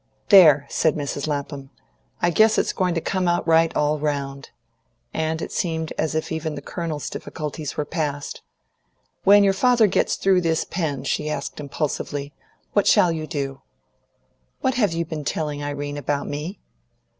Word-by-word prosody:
"There!" 155 -8 +8
said 160 - +1
Mrs. 145 0 -3
Lapham. 140 -2 -4 0.5
"I 175 - +4
guess 220 +4 +4
it's - - +1
going 180 -2 0
to 165 - 0
come 185 +1 -1
out 175 0 +1
right, 165 0 +4
all 150 0 +1
round;" 140 -2 -3 0.6
and 160 0 -1
it - - -6
seemed 160 -2 -2
as 155 0 -1
if 160 - -2
even 160 -1 -3
the 140 - -6
Colonel's 160 -4 -4
difficulties 150 -1 -5
were 150 - -1
past. 145 -4 -3 0.8
"When 205 +1 +7
your 195 -1 +4
father 240 +2 +4
gets 200 - +1
through 190 -2 +3
this, 165 -2 0
Pen," 150 -7 -3
she 150 +2 -1
asked 150 - -4
impulsively, 145 0 -3 0.4
"what 205 - +3
shall 175 - +5
you 155 -1 -4
do?" 140 -3 -4 1.0
"What 260 -1 +1
have 225 -8 +2
you 165 0 -1
been 155 -2 -5
telling 150 0 -2
Irene 145 0 -4
about 145 0 -2
me?" 150 +7 -5
155 Hz, 165 wpm, -23 LUFS, 145-175 Hz, 1.0 s, There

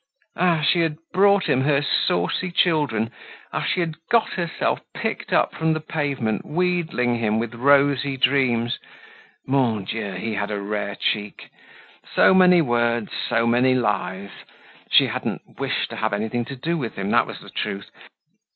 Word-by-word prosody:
Ah! 170 -3 +2
she 160 +4 +3
had 160 -2 0 0.2
brought 200 +1 +4
him 130 - +2
her 140 +1 +2
saucy 110 - 0
children; 145 -11 +1 0.4
ah! - - -1
she 180 - 0
had 160 -2 -3
got 230 -2 +2
herself 170 -3 -1 0.2
picked - - -4
up - - +2
from 160 0 0
the 155 - -2
pavement, 140 -8 -2
wheedling 165 -8 0
him 110 -1 +1
with 115 0 -3
rosy 140 +2 +3
dreams! 125 -3 +1 0.7
Mon 125 -6 +1
Dieu! 105 -1 -4
he 110 +4 -4
had 105 -1 -2
a 105 -1 -3
rare 100 0 -3
cheek! 105 0 -3 0.6
So - - +6
many 180 -2 +6
words, 120 -3 0 0.2
so 115 - +2
many 125 +2 +3
lies. 100 -4 -2 0.6
She - - +6
hadn't - - -5
wished - - -2
to - - -6
have - - -1
anything 110 +3 -2
to 135 - -7
do 165 +6 -2
with 120 -5 -4
him, 100 +1 -3
that - - +3
was - - -8
the - - -13
truth. 100 0 -4
125 Hz, 160 wpm, -23 LUFS, 110-155 Hz, 0.7 s, So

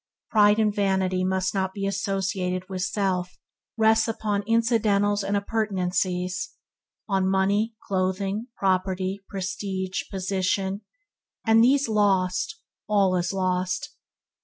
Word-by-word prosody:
Pride 210 -1 +5
and 215 -2 +2
vanity 190 -2 +1
must 190 0 0
not 190 -1 -1
be 195 -1 -3
associated 195 -2 -2
with 190 -1 -4
self 185 -2 -1 0.4
rests 220 0 +4
upon 215 -2 -1
incidentals 215 -3 +2
and 200 +1 0
appurtenances 185 -3 -1 0.3
– - - -63
on 190 -2 +1
money, 200 +4 +1
clothing, 195 +3 -1
property, 190 0 0
prestige, 190 -1 -3
position 190 +1 -1 0.6
and 225 0 +5
these 275 +2 +4
lost, 195 - +1 0.3
all 195 -3 +3
is 175 -1 0
lost. 185 +6 -1
195 Hz, 110 wpm, -25 LUFS, 185-210 Hz, 0.6 s, Pride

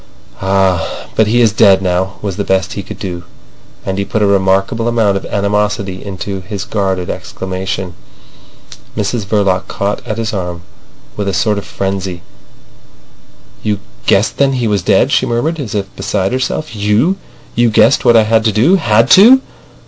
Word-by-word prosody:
"Ah, 95 -3 0
but 110 - +3
he 120 +3 +3
is 115 -3 +4
dead 100 -2 +5
now," 95 0 -1
was 100 -3 -3
the 100 - -2
best 95 -3 0
he 100 - -4
could 95 - -9
do. 90 -3 -5 0.6
And 95 0 -2
he - - +1
put 105 +1 -1
a - - +4
remarkable 95 +3 +1
amount 115 -4 +2
of 95 - -4
animosity 100 -2 -1
into 95 0 -5
his 100 +1 -6
guarded 95 -4 -1
exclamation. 95 -1 -5 1.0
Mrs 105 +1 -1
Verloc 100 -3 +1
caught 100 +1 -2
at 110 - -3
his 115 -1 -2
arm 90 -3 -4 0.5
with 105 -1 -3
a 100 - -1
sort 105 +2 +1
of - - -10
frenzy. 95 -2 -4 1.4
"You 105 -2 -1 0.3
guessed 100 +3 +2
then 140 -1 +3
he 125 -3 0
was 105 -3 +1
dead," - - +2
she - - +2
murmured, 150 +8 -1
as 115 -7 -5
if 100 -1 -4
beside 95 -1 -1
herself. 130 +2 -2
"You! 105 - +1 0.4
You 120 0 +3
guessed 110 - +4
what 120 - +5
I 110 - +5
had 110 +1 +2
to 110 - +3
do. 130 - +3
Had 115 - +3
to!" 245 +7 +7
100 Hz, 170 wpm, -14 LUFS, 95-110 Hz, 1.4 s, to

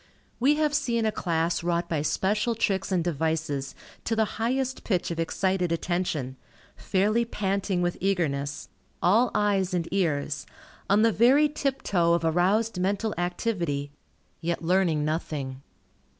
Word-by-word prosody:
We 275 +5 +4
have 300 -1 +1
seen 235 -6 +1
a 215 - +2
class 170 -3 -1
wrought 170 0 0
by 155 -3 -1
special 210 +9 0
tricks 195 -3 0
and 180 -3 +2
devices 160 -4 -2 0.3
to 225 - 0
the 220 0 +3 0.2
highest 260 +2 -1
pitch 180 -5 -1
of 165 - -4
excited 180 +1 0
attention, 165 -6 -2 0.4
fairly 210 +5 +1
panting 195 -4 -1
with 175 0 -1
eagerness, 145 -7 -1 0.3
all 225 +8 +4
eyes 195 -3 +1
and 170 -2 -1
ears, 150 -6 -1 0.4
on 205 +2 +4
the 230 - +5
very 260 +8 +5
tiptoe 265 - 0
of 170 -1 +1
aroused 185 +6 +2
mental 200 +4 0
activity, 175 -6 -2 0.5
yet 170 0 -2
learning 170 -4 +2
nothing. 145 -4 -3
180 Hz, 135 wpm, -26 LUFS, 165-215 Hz, 0.5 s, the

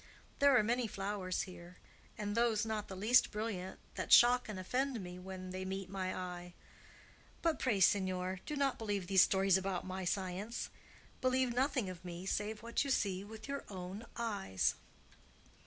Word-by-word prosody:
There 280 -2 +6
are 215 - +4
many 240 +2 +1
flowers 195 -2 -2
here, 180 -1 -11 0.4
and 205 -1 -2
those 230 -1 +2
not 215 -2 -2
the 190 - -7
least 220 +7 +5
brilliant, 210 -4 -4
that - - -4
shock 245 0 +7
and 210 - -4
offend 255 +6 -1
me 180 -1 -7
when 185 0 -7
they 185 0 -4
meet 190 0 -4
my 185 -1 -2
eye. 180 -1 -6 0.9
But 330 -3 +2
pray, 225 -7 +1
signor, 185 -1 +2
do 300 - -2
not 280 -2 +1
believe 205 -4 -2
these 190 0 +6
stories 190 0 +4
about 190 -2 -2
my 185 0 -4
science. 190 +4 -2 0.5
Believe 255 -1 +2
nothing 255 -3 +1
of 185 -2 -7
me 175 0 -6
save 210 +2 -2
what 235 +3 0
you 280 - -4
see 195 -7 +1
with 220 +3 -10
your 280 0 -3
own 190 +3 -7
eyes." 200 - 0
200 Hz, 170 wpm, -35 LUFS, 185-235 Hz, 0.9 s, shock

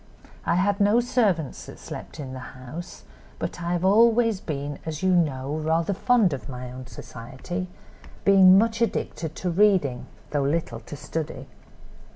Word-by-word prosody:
I - - +3
had 200 +3 +1
no 205 +3 +4
servants 210 - 0
that - - -10
slept - - -9
in 130 -3 -6
the 130 - -6 0.2
house, 150 +8 -9 0.3
but - - -5
I 170 +1 -1
have 175 +1 0
always 225 +1 +4
been, 145 -2 -4
as 160 +1 -5
you 185 - +3
know, 145 -6 +1
rather 160 +4 0
fond 215 - +3
of 130 -4 -6
my 125 -1 -6
own 130 0 -9
society, 130 +9 -7 0.6
being 190 -1 +8
much 225 +2 +2
addicted 165 -8 -2
to 180 - -2
reading, 175 -10 +2 0.2
though 145 - +1
little 140 -3 -1
to 120 +6 -9
study. 155 +2 -5
170 Hz, 160 wpm, -25 LUFS, 140-200 Hz, 0.6 s, being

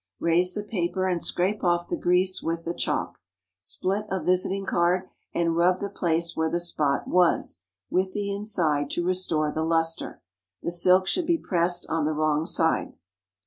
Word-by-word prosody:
Raise 175 +2 +2
the 210 - -3
paper 185 -2 -2
and 175 -2 0
scrape 190 +4 -1
off 175 -1 +1
the - - -1
grease 180 +1 +1
with 165 0 -3
the 170 - -3
chalk. - - -2 0.4
Split 195 - -2
a 190 - -1
visiting 185 +3 0
card, 180 +1 +1 0.2
and 170 -1 0
rub 180 +2 +3
the 200 0 -5
place 170 -3 -1
where 160 0 0
the 170 +2 -1
spot 150 -5 -1
was, 175 - +2 0.3
with 185 +1 +1
the 200 0 -2
inside, 170 -9 0
to 175 - -2
restore 170 -4 0
the 160 - -2
lustre. 165 0 -1 0.4
The - - -1
silk 180 +2 +4
should 345 - 0
be 340 -1 +3
pressed 175 - 0
on 160 -1 0
the 155 - 0
wrong 155 +1 +1
side. 160 -1 +1
175 Hz, 175 wpm, -26 LUFS, 165-185 Hz, 0.4 s, silk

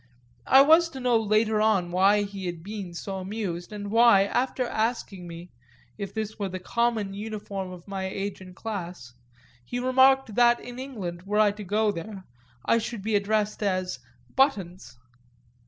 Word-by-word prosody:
I 270 +1 +8
was 325 +3 +5
to 270 - -8
know 250 -2 +2
later 215 0 +2
on 195 -5 +2
why 195 +3 +4
he 200 -2 -6
had 170 -2 -5
been 195 -3 -7
so 195 +3 -5
amused 190 -2 -4
and 205 -1 -6
why, 230 -3 +6
after 250 +4 -1
asking 220 -6 -2
me 170 +1 -10 0.4
if 200 -2 -6
this 215 0 -5
were 200 -2 -2
the 185 - -5
common 220 +1 -1
uniform 200 -2 -5
of 180 0 -11
my 195 -1 -4
age 195 +1 -4
and 185 -1 -12
class, 180 - -6 0.5
he 245 - -5
remarked 260 -1 +4
that 240 +1 +4
in 245 +1 -9
England, 200 -11 -6
were 210 +1 0
I 210 -1 +5
to 210 +1 -8
go 210 +2 +1
there, 195 +2 -7 0.4
I 230 - +3
should 225 -2 -5
be 220 0 0
addressed 210 +1 0
as 185 -6 -1 0.4
"Buttons." 190 - 0
205 Hz, 170 wpm, -26 LUFS, 190-225 Hz, 0.5 s, I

